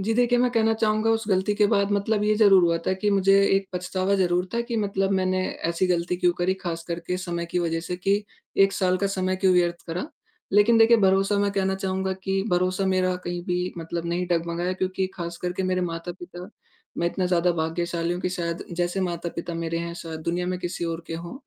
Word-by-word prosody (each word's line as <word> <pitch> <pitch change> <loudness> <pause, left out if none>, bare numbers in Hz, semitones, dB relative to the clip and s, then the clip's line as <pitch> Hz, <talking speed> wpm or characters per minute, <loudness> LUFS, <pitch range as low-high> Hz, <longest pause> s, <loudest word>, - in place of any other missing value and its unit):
जी, 210 +4 0
देखिए 245 0 +3
मैं 250 0 +3
कहना 225 -2 +2
चहूँगा 220 0 +1
उस 225 0 +1
गलती 190 +2 +1
के 210 0 +4
बाद 200 -2 +1
मतलब 205 +1 +1
ये 215 0 +3
ज़रूर 200 -3 +6
हुआ 170 0 +2
था - - +2
कि 205 +1 +2
मुझे 195 -1 +3 0.2
एक 195 0 -2
पछतावा 185 +2 -1
ज़रूर 180 -1 +1
था 235 - +1
कि 235 0 -3
मतलब 195 -2 0
मैंने 185 -1 +1 0.3
ऐसी 170 +2 0
गलती 180 0 0
क्यों 175 -1 +2
करी, 180 +2 +1
ख़ास 170 -3 -5
करके 170 +1 -3
समय 170 -2 -4
की 180 - -2
वजह 165 -1 -1
से 180 +1 -4
कि 200 +3 0 0.3
1 195 0 +5
साल 185 -1 +1
का 200 - +1
समय 185 -1 -1
क्यों 190 0 +3
व्यर्थ 175 -1 +1
करा। 180 - -4 0.4
लेकिन 210 +3 +5
देखिए 230 +1 +7
भरोसा 195 0 +3
मैं 200 0 +2
कहना 190 -1 0
चहूँगा 190 0 -2
कि 195 0 0
भरोसा 185 +2 +1
मेरा 185 -1 +1
कहीं 175 0 -3
भी 180 0 -1
मतलब 170 +1 -4
नहीं 175 +1 -1
डगमगाया 170 +1 0
क्योंकि 185 0 -1
खास 170 -1 -5
करके 180 +1 -2
मेरे 185 0 0
माता-पिता 175 +1 -6 0.5
मैं 170 - +1
इतना 180 +1 -1
ज़्यादा 180 0 +2
भाग्यशाली 170 +1 -2
हूँ 175 - -4
कि - - +1
शायद 170 -2 -3
जैसे 175 +2 -1
माता-पिता 170 -1 -3
मेरे 165 0 -2
हैं, 170 0 -4
शायद 160 -2 -7
दुनिया 175 +2 -2
में 180 0 -2
किसी 175 -1 -4
और 165 0 -3
के 165 - -5
हों, 170 +1 -7
185 Hz, 220 wpm, -25 LUFS, 175-195 Hz, 0.5 s, देखिए